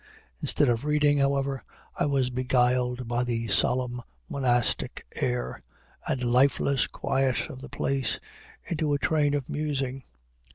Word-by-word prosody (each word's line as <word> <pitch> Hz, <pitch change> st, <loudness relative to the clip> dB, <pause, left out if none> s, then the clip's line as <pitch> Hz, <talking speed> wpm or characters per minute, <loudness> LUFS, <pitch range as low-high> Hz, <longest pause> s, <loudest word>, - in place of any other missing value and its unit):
Instead 145 Hz, -, +2 dB
of 120 Hz, 0 st, +1 dB
reading, 150 Hz, -1 st, +3 dB
however, 140 Hz, -1 st, +1 dB, 0.3 s
I -, -, +1 dB
was 135 Hz, -3 st, +1 dB
beguiled 125 Hz, 0 st, +1 dB
by 120 Hz, +1 st, +1 dB
the 115 Hz, -2 st, -2 dB
solemn 125 Hz, +4 st, +1 dB, 0.3 s
monastic 120 Hz, -3 st, 0 dB
air, 60 Hz, +1 st, -2 dB, 0.5 s
and 125 Hz, -, -1 dB
lifeless 135 Hz, +2 st, +3 dB
quiet 135 Hz, -1 st, 0 dB
of 130 Hz, -, -10 dB
the 140 Hz, -, -9 dB
place, 135 Hz, -3 st, -1 dB, 0.4 s
into 155 Hz, -3 st, -1 dB
a -, -, +3 dB
train 145 Hz, 0 st, +2 dB
of 140 Hz, -3 st, -2 dB
musing. 135 Hz, -3 st, -2 dB
130 Hz, 130 wpm, -27 LUFS, 125-140 Hz, 0.5 s, reading